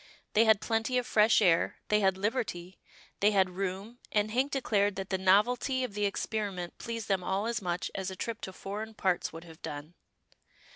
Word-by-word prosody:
They 225 Hz, +2 st, +5 dB
had 220 Hz, -2 st, +5 dB
plenty 225 Hz, +2 st, 0 dB
of 250 Hz, -, 0 dB
fresh 215 Hz, 0 st, +4 dB
air, 170 Hz, -3 st, +3 dB
they 210 Hz, -, +4 dB
had 190 Hz, -2 st, +2 dB
liberty, 190 Hz, -4 st, -3 dB, 0.4 s
they 205 Hz, -, +5 dB
had 190 Hz, -3 st, +3 dB
room, 195 Hz, +5 st, -4 dB
and 210 Hz, 0 st, +1 dB
Hank 260 Hz, +5 st, +1 dB
declared 205 Hz, -7 st, +1 dB
that 195 Hz, 0 st, -5 dB
the 190 Hz, -, +2 dB
novelty 240 Hz, +7 st, +3 dB
of 245 Hz, -5 st, -4 dB
the 205 Hz, 0 st, 0 dB
experiment 200 Hz, -3 st, -3 dB
pleased 230 Hz, -2 st, -5 dB
them 195 Hz, -2 st, +1 dB
all 190 Hz, +3 st, -1 dB
as 235 Hz, -1 st, -1 dB
much 175 Hz, -1 st, -2 dB
as 190 Hz, -1 st, -3 dB
a 190 Hz, -, -6 dB
trip 230 Hz, +4 st, -4 dB
to 190 Hz, -, -5 dB
foreign 210 Hz, +4 st, -6 dB
parts 185 Hz, -4 st, 0 dB
would 165 Hz, +1 st, -9 dB
have 165 Hz, -2 st, -14 dB
done. 145 Hz, +3 st, -7 dB
205 Hz, 195 wpm, -30 LUFS, 185-225 Hz, 0.4 s, They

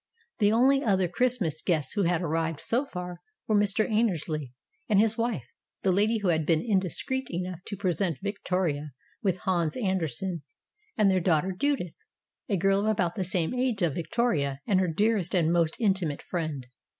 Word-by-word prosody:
The 205 Hz, -1 st, +4 dB
only 270 Hz, +5 st, +4 dB
other 190 Hz, -5 st, +2 dB
Christmas 185 Hz, -, 0 dB
guests 160 Hz, -6 st, 0 dB
who 205 Hz, -, 0 dB
had 175 Hz, -1 st, +1 dB
arrived 165 Hz, -1 st, -1 dB
so 255 Hz, +5 st, 0 dB
far 180 Hz, -5 st, -6 dB, 0.3 s
were 215 Hz, -, +2 dB
Mr. 205 Hz, +2 st, +3 dB
Annersley 165 Hz, -, 0 dB, 0.4 s
and 205 Hz, -2 st, +4 dB
his 220 Hz, +1 st, +3 dB
wife 230 Hz, -, -1 dB, 0.4 s
the 190 Hz, -, +3 dB
lady 210 Hz, +5 st, +2 dB
who 205 Hz, -4 st, 0 dB
had 160 Hz, -2 st, +2 dB
been 160 Hz, +3 st, +1 dB
indiscreet 225 Hz, +6 st, -1 dB
enough 180 Hz, 0 st, -4 dB
to 200 Hz, -, -4 dB
present 180 Hz, -4 st, 0 dB
Victoria 180 Hz, -8 st, -2 dB, 0.3 s
with 190 Hz, -5 st, +1 dB
"Hans 175 Hz, -2 st, 0 dB
Andersen" 185 Hz, -, -1 dB, 0.6 s
and 200 Hz, -2 st, +4 dB
their 185 Hz, -1 st, +2 dB
daughter 170 Hz, +1 st, +2 dB
Judith, 195 Hz, -, -1 dB, 0.5 s
a 200 Hz, -, +2 dB
girl 195 Hz, +2 st, +3 dB
of 205 Hz, -, 0 dB
about 185 Hz, -6 st, +1 dB
the 195 Hz, -, -2 dB
same 175 Hz, 0 st, 0 dB
age 250 Hz, -6 st, 0 dB
of 165 Hz, -5 st, +2 dB
Vic 165 Hz, 0 st, -5 dB
toria 145 Hz, -, +1 dB
and 190 Hz, -2 st, +2 dB
her 185 Hz, -, +2 dB
dearest 200 Hz, +1 st, +1 dB
and 170 Hz, -2 st, +3 dB
most 165 Hz, -2 st, +1 dB
intimate 190 Hz, -9 st, 0 dB
friend. 155 Hz, -7 st, -3 dB
185 Hz, 175 wpm, -27 LUFS, 165-210 Hz, 0.6 s, The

